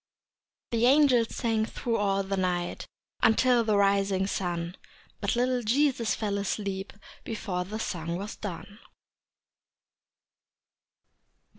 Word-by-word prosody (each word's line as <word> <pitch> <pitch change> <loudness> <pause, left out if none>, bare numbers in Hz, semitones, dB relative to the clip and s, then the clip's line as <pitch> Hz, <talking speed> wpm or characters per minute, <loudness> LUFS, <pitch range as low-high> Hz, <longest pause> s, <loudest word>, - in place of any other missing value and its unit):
The 235 +1 +3
angels 260 -4 +4
sang 225 -2 +1
thro' 230 +1 -2
all 195 -1 +1
the 195 +1 -2
night 180 -2 -2 0.3
Until 240 +1 +4
the 215 -2 +2
rising 195 -1 +2
sun, 175 -2 -3 0.4
But - - 0
little 250 +1 +1
Jesus 240 0 +2
fell 205 -2 -2
asleep 200 -1 -3 0.3
Before 185 -5 -3
the 210 +4 -5
song 170 -6 -3
was 205 +3 -6
done. 205 +1 -7
205 Hz, 110 wpm, -28 LUFS, 190-230 Hz, 0.4 s, angels